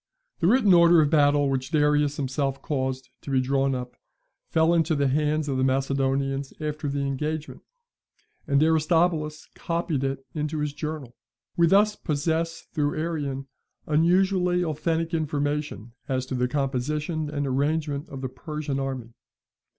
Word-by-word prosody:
The 170 - +2
written 215 -3 +5
order 170 -1 +7
of 150 -2 +3
battle 145 -2 +4
which 130 -1 -1
Darius 150 -1 +2
himself 135 0 -1
caused 130 -2 -2
to - - -9
be 135 -1 +2
drawn 135 +1 +1
up, 125 -1 -6 0.5
fell 160 +1 +3
into 165 -1 +2
the 140 -1 +2
hands 150 +2 +1
of 135 -2 -1
the 130 - +1
Macedonians 135 +1 0
after 150 -1 -3
the 140 0 -2
engagement, 150 +3 -3 0.9
and 140 0 +3
Aristobulus 160 -1 +1
copied 165 -4 -2
it 135 0 -3
into 150 +1 -2
his 150 -1 -2
journal. 150 -5 -5 0.4
We 170 -1 +4
thus 210 +4 +4
possess, 165 +2 -1
through 145 -3 0
Arrian, 145 -4 -3 0.4
unusually 180 +3 +2
authentic 165 +1 -1
information 145 - -2 0.2
as 130 -1 0
to 130 - -6
the 125 0 +1
composition 150 +4 -2
and 145 -1 -2
arrangement 145 +2 -1
of 135 -1 -7
the 130 - -3
Persian 145 +1 -4
army. 130 -4 -4
150 Hz, 145 wpm, -25 LUFS, 135-160 Hz, 0.9 s, order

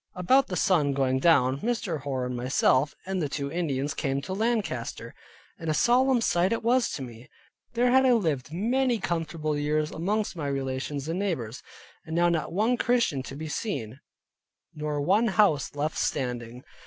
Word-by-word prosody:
About 255 +10 +3
the 180 - -4
sun 155 -7 +2
going 130 -1 +1
down, 135 -4 +3
Mr. 215 - -2
Hoar, 130 -3 -2
and 125 0 -4
myself, 130 +3 +2
and 190 -1 -2
the 150 - -1
two 140 0 -3
Indians 145 -4 -1
came 135 -1 -1
to 185 - -4
Lancaster, 220 +1 -2 0.5
and 165 - -4
a 155 - +1
solemn 250 - +3
sight 180 -3 +2
it 230 - -1
was 245 +1 +3
to 135 - -4
me. 120 -1 -11 0.4
There 245 +1 +2
had 265 +1 +5
I 250 - +5
lived 155 - 0
many 240 +7 +1
comfortable 165 -4 -2
years 150 +1 0
amongst 205 +5 -1
my 150 -4 -3
relations 135 +1 -3
and 165 +3 -2
neighbors, 130 - -3 0.4
and 160 0 -6
now 175 0 +4
not 165 -2 -1
one 220 +7 +1
Christian 235 - +1
to 135 - -8
be 155 +2 -6
seen, 135 - -4 0.7
nor 150 -1 -3
one 200 +10 +3
house 190 -10 +2
left 150 +2 -2
standing. 125 -1 -3
160 Hz, 175 wpm, -27 LUFS, 140-210 Hz, 0.7 s, had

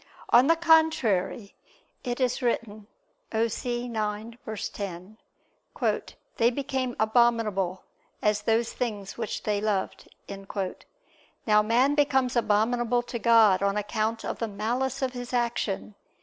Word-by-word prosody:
On 250 +3 +6
the 330 - +5
contrary, 315 - +2 0.5
It 245 0 -3
is 255 0 0
written 220 -4 -2 0.4
(Osee 240 +2 -1
9:10): 215 -3 -5 0.2
"They 230 0 +4
became 265 -1 -3
abominable 220 -5 +2 0.4
as 210 0 +1
those 225 +2 +1
things 205 -5 -4
which 220 -3 -4
they 205 -1 0
loved." 210 -3 -2 1.4
Now 210 -1 +5
man 240 +6 +3
becomes 265 -4 +2
abominable 235 +2 +1
to 240 -1 -5
God 220 -4 +5
on 200 +1 +1
account 220 +2 -2
of - - -4
the 230 - -1
malice 245 +6 -2
of 260 -1 -1
his 245 0 -7
action. 235 -4 -1
230 Hz, 115 wpm, -27 LUFS, 210-245 Hz, 1.4 s, On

